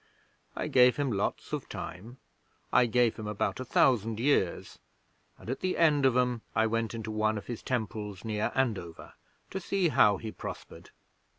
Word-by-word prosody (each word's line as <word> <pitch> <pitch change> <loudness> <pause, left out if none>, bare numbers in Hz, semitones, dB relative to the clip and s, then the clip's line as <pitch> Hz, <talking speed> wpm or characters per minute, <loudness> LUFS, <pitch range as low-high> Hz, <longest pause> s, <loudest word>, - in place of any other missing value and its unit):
I - - -3
gave 125 -1 +5
him 145 -3 0
lots 100 -1 -2
of - - -4
time 110 +8 -7 0.6
I 125 -1 +5
gave 120 0 +2
him 110 - -6
about 105 +3 -2
a - - -3
thousand 115 -4 +2
years 120 -9 0 0.6
and - - -15
at 130 - -3
the 185 - -1
end 150 -5 +4
of 125 -1 +2
'em 125 -2 +1
I 110 - +3
went 115 +1 -1
into 110 -1 -5
one 110 0 0
of 105 - -7
his 120 -2 -6
temples 110 -5 -4
near 105 -1 -1
Andover 105 -11 -2 0.4
to 190 - -3
see 190 -1 0
how 105 -8 +4
he 110 +1 -6
prospered. - - -9
115 Hz, 175 wpm, -29 LUFS, 110-130 Hz, 0.6 s, gave